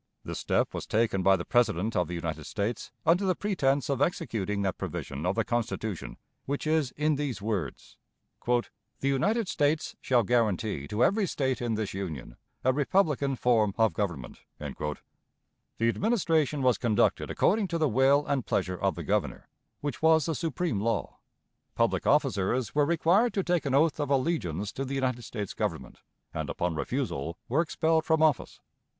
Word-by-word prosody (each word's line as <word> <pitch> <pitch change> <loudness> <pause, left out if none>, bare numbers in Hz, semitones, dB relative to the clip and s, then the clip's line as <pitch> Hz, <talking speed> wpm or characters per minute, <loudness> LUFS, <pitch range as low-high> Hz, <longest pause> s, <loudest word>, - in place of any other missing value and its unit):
This - - -5
step - - 0
was - - -5
taken 110 -3 +1
by 95 +1 +5
the 85 - -4
President 115 -3 +1
of 90 -2 +1
the 90 - -4
United 80 -2 -4
States 110 +3 -3
under 175 +4 +4
the 185 -2 +2
pretense 145 -9 0
of 140 -2 -1
executing 105 - -1
that 95 -2 -2
provision 70 +5 -4
of 90 - +1
the 115 - +1
Constitution 110 -5 -3 0.3
which 140 +2 -3
is 155 -3 +2
in 150 0 +1
these 140 -6 -2
words: 100 - -4 0.5
"The 120 -1 +3 0.4
United 190 - +1
States 150 -1 0
shall 125 -3 +3
guarantee 105 - 0
to 105 +9 +1
every 200 -1 +3
State 130 -5 -1
in 120 -2 0
this 110 -2 -3
Union 80 -11 -5 0.3
a 130 - +3
republican 145 -2 +1
form 110 -5 +2
of 110 -5 +3
government." 85 -10 -4 0.2
The 75 -1 -4 0.9
administration 160 - +1
was 125 -2 +3
conducted 115 -5 +1
according 205 +1 +2
to 170 -1 -2
the 155 -2 +2
will 135 +4 +3
and 140 -3 0
pleasure 90 -3 -1
of - - 0
the - - -5
Governor, - - -2 0.3
which 145 -4 -4
was 160 -2 +5
the 165 - -1
supreme 160 - -2
law. 115 -1 -2 0.6
Public - - +1
officers 105 +4 +1
were 145 -1 +3
required 175 +8 +3
to 195 - +1
take 175 -4 0
an 135 - +1
oath 155 +2 +3
of 145 -2 -1
allegiance 130 - 0
to 135 - -4
the 135 +1 -4
United 130 -2 -1
States 105 -4 -5
Government, 65 - -4 0.3
and - - -3
upon 90 -1 -1
refusal 105 - -3
were 140 +7 +2
expelled 160 -1 +1
from 160 -1 +2
office. 155 -2 +1
130 Hz, 170 wpm, -28 LUFS, 105-155 Hz, 0.9 s, by